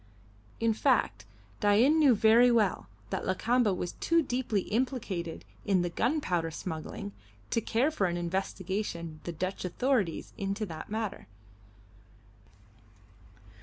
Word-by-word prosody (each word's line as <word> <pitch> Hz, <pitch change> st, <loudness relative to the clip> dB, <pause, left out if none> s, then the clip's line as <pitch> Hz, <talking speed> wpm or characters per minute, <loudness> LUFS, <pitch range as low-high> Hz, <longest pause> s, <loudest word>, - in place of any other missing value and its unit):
In 230 Hz, -1 st, +2 dB
fact, 215 Hz, -, +1 dB, 0.3 s
Dain 235 Hz, +10 st, +4 dB
knew 280 Hz, -6 st, +6 dB
very 225 Hz, +4 st, +6 dB
well 215 Hz, -, +2 dB, 0.2 s
that -, -, -2 dB
Lakamba 225 Hz, +4 st, +2 dB
was 180 Hz, -1 st, -2 dB
too 335 Hz, 0 st, +1 dB
deeply 245 Hz, -6 st, -1 dB
implicated 210 Hz, -8 st, -2 dB, 0.2 s
in 190 Hz, -3 st, +2 dB
the 175 Hz, -, -2 dB
gunpowder 180 Hz, -, 0 dB
smuggling 160 Hz, -, -6 dB, 0.4 s
to 230 Hz, -, +2 dB
care 245 Hz, +8 st, +1 dB
for 200 Hz, -11 st, +1 dB
an 175 Hz, 0 st, -2 dB
investigation 175 Hz, -2 st, -3 dB
the 175 Hz, -, -3 dB
Dutch 185 Hz, +4 st, -3 dB
authorities 200 Hz, -, 0 dB
into 200 Hz, +2 st, -2 dB
that 160 Hz, -4 st, -8 dB
matter. 215 Hz, -1 st, -4 dB
205 Hz, 120 wpm, -30 LUFS, 175-240 Hz, 0.4 s, knew